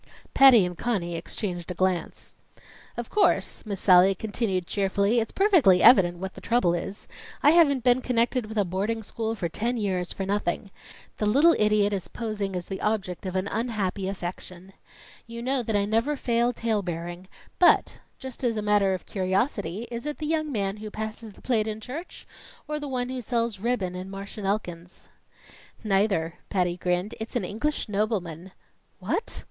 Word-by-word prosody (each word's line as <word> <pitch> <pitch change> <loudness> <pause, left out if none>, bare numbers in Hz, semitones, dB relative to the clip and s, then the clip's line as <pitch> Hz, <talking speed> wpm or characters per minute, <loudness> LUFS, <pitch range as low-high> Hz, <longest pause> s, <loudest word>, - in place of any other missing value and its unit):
Patty 255 -8 +7
and 180 0 -5
Conny 175 -5 -2
exchanged 175 +1 -4
a 180 - -4
glance. 185 -1 -2 0.6
"Of 240 -1 -5
course," 420 - +1
Miss 200 -3 -3
Sallie 185 0 +6
continued 205 -3 -2
cheerfully, 200 +4 +1
"it's 225 - -2
perfectly 325 - +4
evident 175 -8 +7
what 190 +2 -6
the - - -12
trouble 230 -8 +2
is. 185 +4 -5 0.4
I 295 - +7
haven't 285 -7 +4
been 250 0 +4
connected 245 -1 0
with 220 0 -7
a 205 - +3
boarding 205 +5 -2
school 225 +2 -3
for 180 -5 -2
ten 235 +9 -2
years 185 -5 -2
for 195 - -4
nothing. 200 0 -2 0.5
The 210 - 0
little 290 +10 +5
idiot 210 -1 +3
is 190 -3 -3
posing 210 -4 -4
as 180 -1 -3
the 190 - -6
object 195 -4 -2
of 185 - -4
an 185 +1 0
unhappy 200 -4 -2
affection. 185 0 -7 0.5
You 235 0 -7
know 265 +1 0
that 220 -2 -2
I 200 0 +2
never 225 +8 +1
favor 240 -1 +1
talebearing, 180 -6 -3 0.3
but, 360 - +4 0.2
just 265 0 -9
as 235 -3 +1
a 210 - -2
matter 205 -2 +3
of 185 - -9
curiosity, 195 - -1
is 235 +4 -5
it 300 - -4
the 305 - -4
young 310 -1 -1
man 200 -4 -1
who 215 0 -7
passes 220 0 -6
the - - -19
plate 225 -4 +1
in 215 0 -4
church, 275 +10 -8 0.4
or 300 0 -2
the 295 - -5
one 250 -1 -2
who 255 -1 -4
sells 230 -3 -1
ribbon 210 -5 -1
in 185 +1 -6
Marsh 195 +1 -8
and 200 - -3
Elkins's?" 180 -4 -4 0.7
"Neither." 195 -5 +1
Patty 180 -3 0
grinned. 180 +3 -1
"It's 220 +2 -7
an 230 -6 0
English 235 +11 -2
nobleman." 195 -5 -2 0.5
"What?" - - -3
210 Hz, 175 wpm, -26 LUFS, 185-235 Hz, 0.7 s, Patty